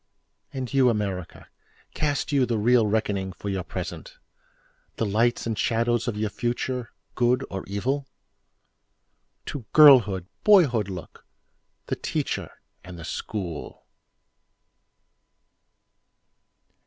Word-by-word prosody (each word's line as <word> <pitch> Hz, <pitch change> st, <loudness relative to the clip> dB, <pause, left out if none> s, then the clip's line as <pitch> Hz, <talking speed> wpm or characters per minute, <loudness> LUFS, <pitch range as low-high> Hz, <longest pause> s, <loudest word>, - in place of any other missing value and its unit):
And 130 Hz, -1 st, -5 dB
you, 130 Hz, -2 st, +5 dB
America, 100 Hz, -6 st, -3 dB, 0.5 s
Cast 145 Hz, -1 st, -1 dB
you 135 Hz, -3 st, +3 dB
the 115 Hz, -, 0 dB
real 115 Hz, +1 st, +4 dB
reckoning 100 Hz, -3 st, -1 dB
for 100 Hz, -, -6 dB
your 95 Hz, -1 st, -2 dB
present? -, -, -7 dB, 0.8 s
The -, -, -1 dB
lights 115 Hz, +4 st, +1 dB
and 115 Hz, -1 st, -1 dB
shadows 115 Hz, +2 st, 0 dB
of 110 Hz, -3 st, -2 dB
your 105 Hz, 0 st, -1 dB
future—good 120 Hz, +1 st, -2 dB
or 95 Hz, -1 st, -4 dB
evil? 130 Hz, +8 st, -2 dB, 1.4 s
To 135 Hz, -6 st, -6 dB
girlhood, 120 Hz, -, +7 dB, 0.2 s
boyhood 140 Hz, -, +5 dB
look—the 90 Hz, -3 st, -10 dB
Teacher -, -, -3 dB, 0.3 s
and 90 Hz, -1 st, -10 dB
the 85 Hz, -, -8 dB
School. 85 Hz, -5 st, -6 dB
115 Hz, 100 wpm, -25 LUFS, 100-125 Hz, 1.4 s, girlhood